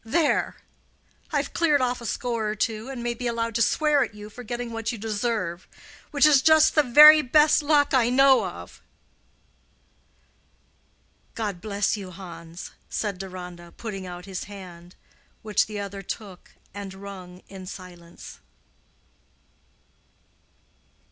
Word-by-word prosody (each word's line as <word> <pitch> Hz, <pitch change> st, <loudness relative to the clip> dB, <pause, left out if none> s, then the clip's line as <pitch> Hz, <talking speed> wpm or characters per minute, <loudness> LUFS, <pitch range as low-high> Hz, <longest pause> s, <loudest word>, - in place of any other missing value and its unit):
There! 300 Hz, +8 st, +1 dB, 0.8 s
I've 285 Hz, -2 st, -1 dB
cleared 305 Hz, -4 st, +3 dB
off 250 Hz, -1 st, -1 dB
a 235 Hz, -, -6 dB
score 230 Hz, -3 st, -2 dB
or 210 Hz, -, -3 dB
two, 220 Hz, +3 st, -2 dB
and 255 Hz, -3 st, -6 dB
may 240 Hz, 0 st, -1 dB
be 245 Hz, +1 st, -4 dB
allowed 230 Hz, -1 st, -2 dB
to 230 Hz, -, 0 dB
swear 295 Hz, +5 st, +3 dB
at 210 Hz, -, -7 dB
you 210 Hz, 0 st, -10 dB
for 245 Hz, -, -10 dB
getting 240 Hz, 0 st, -5 dB
what 225 Hz, 0 st, -3 dB
you 235 Hz, -, -6 dB
deserve—which 220 Hz, -, -2 dB
is 290 Hz, -3 st, +6 dB
just 315 Hz, +1 st, +5 dB
the 305 Hz, -, +5 dB
very 300 Hz, +4 st, +9 dB
best 300 Hz, +3 st, +4 dB
luck 290 Hz, -1 st, +2 dB
I 245 Hz, -3 st, +4 dB
know 265 Hz, +1 st, +5 dB
of." -, -, -10 dB, 2.5 s
"God 205 Hz, -6 st, -4 dB
bless 205 Hz, -1 st, -1 dB
you, 195 Hz, -2 st, -8 dB
Hans!" 170 Hz, -2 st, -10 dB, 0.2 s
said 205 Hz, -4 st, -3 dB
Deronda, 180 Hz, -2 st, -9 dB
putting 195 Hz, -5 st, -6 dB
out 180 Hz, 0 st, -8 dB
his 190 Hz, -2 st, -6 dB
hand, 180 Hz, -3 st, -12 dB, 0.5 s
which 215 Hz, -1 st, +1 dB
the 210 Hz, -1 st, -6 dB
other 200 Hz, 0 st, -6 dB
took 195 Hz, -1 st, -9 dB, 0.2 s
and 200 Hz, -1 st, -7 dB
wrung 190 Hz, -2 st, -10 dB
in 190 Hz, -1 st, -10 dB
silence. 175 Hz, -3 st, -11 dB
215 Hz, 135 wpm, -25 LUFS, 190-250 Hz, 2.5 s, very